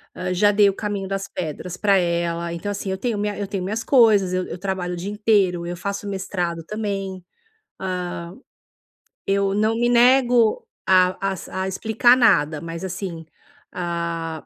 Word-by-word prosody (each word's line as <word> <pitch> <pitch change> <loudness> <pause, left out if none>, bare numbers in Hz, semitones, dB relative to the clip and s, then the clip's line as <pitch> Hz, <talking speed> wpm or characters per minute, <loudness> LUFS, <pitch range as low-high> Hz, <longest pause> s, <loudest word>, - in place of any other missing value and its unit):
hã, 180 0 -3
já 205 +3 +4
dei 205 0 +5
o 195 - -3
caminho 200 -2 -3
das 195 0 -3
pedras 180 +1 -5
para 200 -2 +3
ela. 170 -1 -1
Então 170 +5 -5
assim, 200 -1 -4
eu 190 - -2
tenho 225 +1 -2
minha 205 0 -2
eu 205 - -3
tenho 195 -2 -3
minhas 215 +4 -3
coisas, 215 -8 +4
eu 185 0 0
eu - - -6
trabalho 190 -2 -3
o - - -5
dia 190 +4 -4
inteiro, 200 -5 +2
eu 175 0 -5
faço 200 +2 -4
mestrado 180 -4 -3
também. 195 -3 -4 0.6
Hã, 180 -2 -4 0.9
eu 195 0 +1
não 215 +2 +1
me 240 +1 +1
nego 245 -2 +4 0.2
a 185 +1 +3
às, 180 - -9
a 190 0 -3
explicar 220 +5 +3
nada, 155 -10 +3
mas 165 +1 -6
assim, 180 -3 -5 0.5
ah, 170 -2 -4
190 Hz, 170 wpm, -22 LUFS, 175-205 Hz, 0.9 s, dei